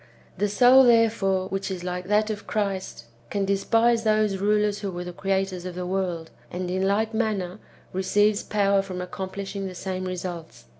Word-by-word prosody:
The 205 - 0
soul, 250 +5 +7
therefore, 220 -6 +3
which 195 +1 -3
is 185 -2 -5
like 180 0 -4
that 210 +1 +2
of 210 - -7
Christ 195 - -3 0.2
can 200 -1 -1
despise 225 +4 +2
those 215 -2 +2
rulers 210 0 +1
who 200 - -3
were 175 -1 -5
the 180 0 -7
creators 195 -1 -1
of 180 -1 -6
the 180 0 -4
world, 180 -3 -2 0.2
and, 180 0 -4
in 190 +1 0
like 215 +3 +1
manner, 210 -4 -1 0.3
receives 205 +3 +2
power 200 -1 +2
for 185 -2 -6
accomplishing 195 +2 -5
the 185 - -8
same 185 0 -4
results. 175 -10 -6
195 Hz, 170 wpm, -25 LUFS, 185-210 Hz, 0.3 s, soul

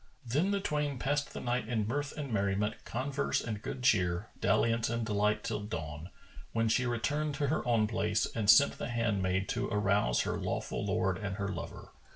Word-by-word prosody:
Then 145 +11 +1
the 200 0 +1
twain 150 -6 -1
passed 140 +3 -1
the - - -6
night 120 -2 -1
in 110 -4 0
mirth 145 +5 -2
and 140 -5 -4
merriment, 100 +1 +1
converse 135 +3 -1
and 105 -3 -4
good 125 +2 -5
cheer, 95 -5 +2
dalliance 115 0 +2
and 115 0 -1
delight 105 0 +1
till - - -2
dawn, 80 -5 -5 0.4
when 115 0 +2
she 125 +3 +2
returned 145 +5 -1
to 145 -2 0
her 155 - 0
own 115 -3 +3
place 110 0 +1
and 105 -3 -2
sent 140 +5 +6
the - - -3
handmaid 100 -5 0
to - - -1
arouse 100 - +2
her - - -2
lawful - - -2
lord 95 -1 0
and 100 -2 -3
her 100 -1 -2
lover. - - -7
115 Hz, 190 wpm, -32 LUFS, 100-130 Hz, 0.4 s, sent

